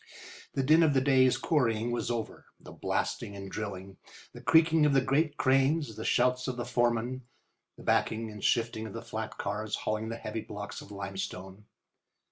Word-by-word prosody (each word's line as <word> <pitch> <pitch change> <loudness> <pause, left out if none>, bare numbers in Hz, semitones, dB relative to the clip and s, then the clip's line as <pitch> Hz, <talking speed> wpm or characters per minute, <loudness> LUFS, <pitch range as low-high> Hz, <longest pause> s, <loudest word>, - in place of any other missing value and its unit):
The 135 - +1
din 155 +5 +5
of 155 -4 +4
the - - +6
day's 130 -1 +4
quarrying 120 -6 +1
was 120 - -2
over—the 115 -2 -6
blasting 100 - -2
and 100 -1 -8
drilling, 95 -2 -6 0.4
the - - -10
creaking 160 -1 +5
of 145 - +2
the 135 - +5
great 145 +3 +1
cranes, 135 -1 +2
the 110 - -6
shouts 125 +2 +2
of 130 -1 -3
the 120 - -3
foremen, 120 +1 0 0.6
the - - -12
backing 110 0 +1
and 105 -2 -10
shifting 115 -1 +1
of 100 - -9
the 115 - -6
flat 110 0 -5
cars 105 +1 -2
hauling 110 +1 -2
the 115 - -4
heavy 110 0 -4
blocks 105 -1 -7
of - - -13
limestone. 95 0 -6
115 Hz, 175 wpm, -30 LUFS, 105-130 Hz, 0.6 s, the